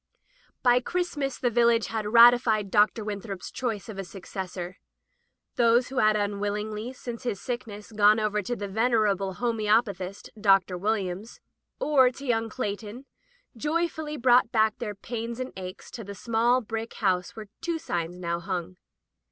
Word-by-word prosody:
By 245 -1 +5
Christmas 290 -5 -2
the 245 - 0
village 235 -1 +3
had 220 -2 -3
ratified 230 -3 +6
Dr. 215 +1 +3
Winthrop's 200 -2 -5
choice 225 -6 -3
of 210 -3 -7
a - - -2
successor. 185 -1 -7 0.8
Those 240 +1 +4
who 265 - -7
had 215 -3 +4
unwillingly, 210 +2 -2
since 240 -2 -7
his 235 -6 -3
sickness, 225 -4 -6
gone 210 0 +5
over 210 -1 0
to 240 +5 -3
the 205 -2 -5
venerable 205 -3 +1
homoeopathist. 215 -4 0
Dr. 195 -3 +4
Williams, 200 +1 -2 0.4
or 280 - +4
to 275 +2 -10
young 225 -3 0
Cleighton, 215 +2 -5 0.5
joyfully 310 +2 -2
brought 245 -2 +4
back 220 -2 +2
their 210 -3 -4
pains 230 +3 -5
and 255 0 -4
aches 185 0 -8
to 230 - -7
the 200 0 -8
small 235 +4 +2
brick 225 0 -5
house 185 -4 0
where 215 -2 -9
two 335 -1 -1
signs 175 - -3
now 170 -1 -2
hung. 180 -1 -4
220 Hz, 150 wpm, -27 LUFS, 200-240 Hz, 0.8 s, ratified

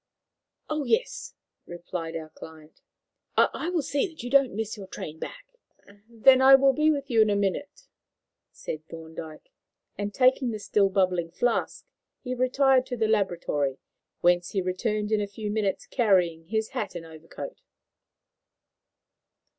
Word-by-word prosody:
"Oh 305 -1 -2
yes," - - -1 0.3
replied 175 -1 -6
our 160 -1 -6
client; 160 -1 -13 0.6
"I 330 - +2
will 345 -4 0
see 285 +6 0
that 330 -7 -11
you 245 - -5
don't 275 -5 +4
miss 220 0 -3
your 200 -3 -9
train 160 -3 -8
back." - - -8 0.6
"Then 255 +3 +5
I 270 +1 +9
will 270 0 +4
be 305 +4 +3
with 280 -3 -1
you 225 -2 +5
in 215 - +4
a 205 - +2
minute," 205 - -2 0.6
said 155 0 -7
Thorndyke; 160 - -10 0.5
and, 205 0 -2
taking 255 +2 +3
the 220 - -3
still 205 -1 +2
bubbling 185 -3 +1
flask, 230 +8 -1 0.4
he 250 -1 -3
retired 255 +1 +3
to 245 - -4
the 220 -1 +1
laboratory, 175 -10 0 0.4
whence 175 0 +2
he 195 - +1
returned 210 +3 -2
in 215 -1 +2
a 205 - -2
few 205 +1 -5
minutes 210 -3 -1
carrying 180 -9 +1
his 220 +4 -2
hat 205 - -4
and 170 -1 -6
overcoat. 165 - -10
210 Hz, 150 wpm, -26 LUFS, 175-265 Hz, 0.6 s, I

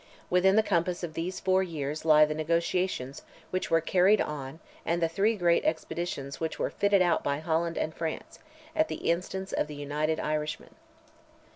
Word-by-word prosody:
Within 185 +2 +4
the 220 - +5
compass 180 -2 0
of 165 -2 -4
those 175 +4 -3
four 190 0 +2
years 155 -4 -4
lie 155 -1 +7
the 150 - -2
negotiations 165 -3 -1 0.3
which 185 - -2
were 165 - +3
carried 185 +5 +4
on 145 0 -4 0.2
and 170 +1 0
the 165 - +2
three 200 +7 +1
great 175 -3 +2
expeditions 155 -4 -3
which 160 -1 -3
were - - -1
fitted 200 -2 +3
out 175 -2 +1
by 140 - 0
France 165 +1 -1
and 160 - -2
Holland, 160 -1 -3 0.5
at 315 0 +3
the - - -1
instance 190 +2 -3
of - - 0
the 150 - -8
United 150 +2 -1
Irishmen. 150 0 -3
165 Hz, 175 wpm, -28 LUFS, 155-185 Hz, 0.5 s, lie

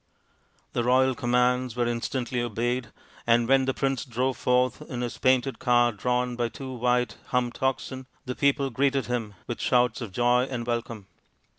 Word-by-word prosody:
The 120 - 0
royal 130 +2 +4
commands 125 -1 +1
were 120 -1 +1
instantly 120 +1 -2
obeyed, 120 +1 -1 0.4
and 115 0 +4
when 135 0 +4
the 130 - 0
prince 135 -2 0
drove 130 0 -1
forth 125 -1 +1
in 125 -1 -4
his 120 -1 -4
painted 130 -1 +2
car 120 -1 +3
drawn 125 +3 -1
by 120 -1 -1
two 130 +2 -7
white 125 0 0
humped 125 -1 -1
oxen, 130 0 -2 0.2
the 125 - -3
people 140 0 +1
greeted 135 +2 +1
him 115 -4 -3
with 120 - -5
shouts 125 -2 +2
of 115 -5 -5
joy 120 +4 +3
and 125 -3 -4
welcome. 115 -3 -3
125 Hz, 165 wpm, -26 LUFS, 120-130 Hz, 0.4 s, royal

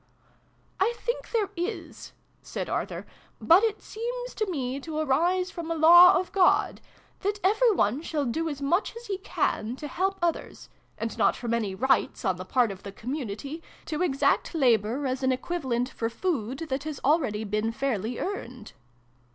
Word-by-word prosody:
" - - -37 0.3
I 445 +5 +2
think 475 0 -3
there 425 -4 0
is" 350 +5 -5 0.3
said - - -5
Arthur: - - -3 0.3
"but 340 +4 +6
it 440 -2 0
seems - - -5
to 430 -2 -2
me 270 -5 -2
to 310 +2 -6
arise 345 +6 +1
from 335 -2 -6
a 330 - 0
Law 345 +4 +8
of 365 - -5
God 375 -2 +3 0.4
that 410 +1 -2
every 440 +5 +4
one 250 - +1
shall 305 -3 -2
do 320 +7 -1
as 285 -2 -5
much 350 +11 +1
as 470 +1 -9
he 390 -3 -3
can 235 - -1
to 295 +2 -7
help 385 +6 -1
others 345 -1 -3 0.3
and 225 0 -4
not - - +4
from 235 -1 -3
any 215 -5 -1
rights, 265 +1 +1
on 190 -2 +1
the 185 - -7
part 245 0 +2
of 195 0 -9
the 200 - -8
community, 265 - -5 0.2
to 310 0 -3
exact 330 0 +1
labour 245 -1 +2
as 260 0 -1
an 260 0 +2
equivalent 255 -3 -2
for 225 -2 -3
food 260 - -2
that 265 +1 -2
has 305 -3 -5
already 260 -8 +2
been 215 +2 -1
fairly 235 -3 -2
earned." 250 - -5
290 Hz, 175 wpm, -27 LUFS, 240-365 Hz, 0.4 s, Law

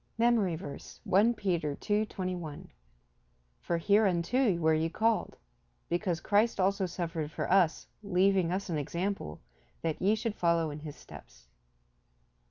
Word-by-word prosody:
MEMORY 225 -7 +3
VERSE, 155 -4 -9
I 210 +5 +6
Peter 170 -7 -1
2: 210 +5 0
21 180 -7 -5 0.9
"For 170 - -1
hereunto 200 +3 +2
were 160 -1 +3
ye 160 +1 +1
called; 225 +5 0 0.5
because 175 -1 -1
Christ 210 +3 +2
also 190 0 +1
suffered 165 -3 -4
for 155 - -4
us, 180 -4 +3 0.2
leaving 190 -2 +2
us 190 +2 -2
an 165 -4 -1
example, 170 - -3 0.4
that 160 -2 -2
ye 205 +3 +3
should 225 0 -2
follow 170 -4 +1
in 145 - -7
his 150 -1 -8
steps." - - -14
180 Hz, 135 wpm, -30 LUFS, 165-200 Hz, 0.9 s, I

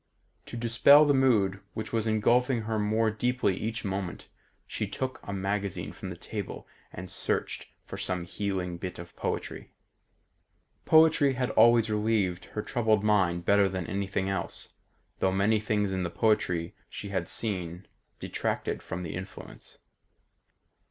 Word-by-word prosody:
To 120 - -6
dispel 120 +6 +6
the 145 - +4
mood 110 -8 +3 0.2
which 110 +1 -5
was 115 -1 0
engulfing 120 +3 +2
her 110 0 -2
more 110 +1 +2
deeply 120 -2 0
each 115 +2 -4
moment, 95 -2 -4 0.4
she - - -3
took 130 0 -4
a - - -7
magazine 100 -2 -2
from 95 - -7
the 85 - -7
table 100 +2 -6 0.2
and 95 - -7
searched 90 - -2 0.2
for - - -7
some 90 -2 -2
healing 95 -2 -3
bit 90 +1 -6
of 85 0 -10
poetry. - - -4 1.2
Poetry 160 -3 +5
had 125 -1 -1
always 115 0 +5
relieved 105 -4 0
her 105 - -2
troubled 110 -3 +1
mind 95 -5 +2
better 100 -1 +4
than 95 -2 -3
anything 95 0 -2
else, 95 -3 -4 0.5
though 95 - +2
many 100 +3 +2
things 105 -2 0
in 95 -1 -1
the 90 - -1
poetry 90 -5 +1 0.2
she 100 - -7
had 95 -4 -2
seen 90 -4 -3 0.3
detracted - - -2
from 90 0 -5
the 80 - -5
influence. 95 +1 -9
100 Hz, 145 wpm, -28 LUFS, 95-115 Hz, 1.2 s, dispel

